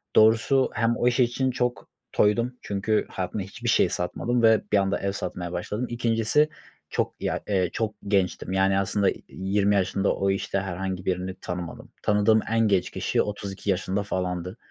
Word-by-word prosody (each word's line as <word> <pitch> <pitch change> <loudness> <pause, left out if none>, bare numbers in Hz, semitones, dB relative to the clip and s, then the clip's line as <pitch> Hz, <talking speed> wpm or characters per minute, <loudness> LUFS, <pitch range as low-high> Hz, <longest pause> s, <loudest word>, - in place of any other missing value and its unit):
Doğrusu 115 +5 +5
hem 115 +2 +1
o 120 - +2
iş 120 +1 +2
için 130 +2 +2
çok 125 -1 -2 0.2
toydum 115 +4 +2
çünkü 105 +2 0
hayatımda 95 +2 -3
hiçbir 95 - -5
şey - - +4
satmadım 120 +7 -1
ve 110 -1 +6
bir 105 - +5
anda 100 0 +1
ev 100 - -1
satmaya 90 -3 -4
başladım. 105 +7 -3
2'ncisi 120 +5 +2 0.4
çok - - -1
ya, - - -1
eee, 95 -4 +1
çok 110 -2 -1
gençtim, 95 -2 0
yani 95 0 +3
aslında, 100 0 +2
iii, - - -10
20 100 +2 +1
yaşında 100 +1 +1
o 100 - 0
işte 100 0 -1
herhangi 95 0 -4
birini 90 0 -2
tanımadım. 90 -2 -6
Tanıdığım 105 +1 +4
en 115 - +2
genç 95 -3 +2
kişi - - 0
32 100 -1 -4
yaşında 95 +1 0
falandı. 90 0 -3
100 Hz, 165 wpm, -26 LUFS, 95-115 Hz, 0.4 s, ve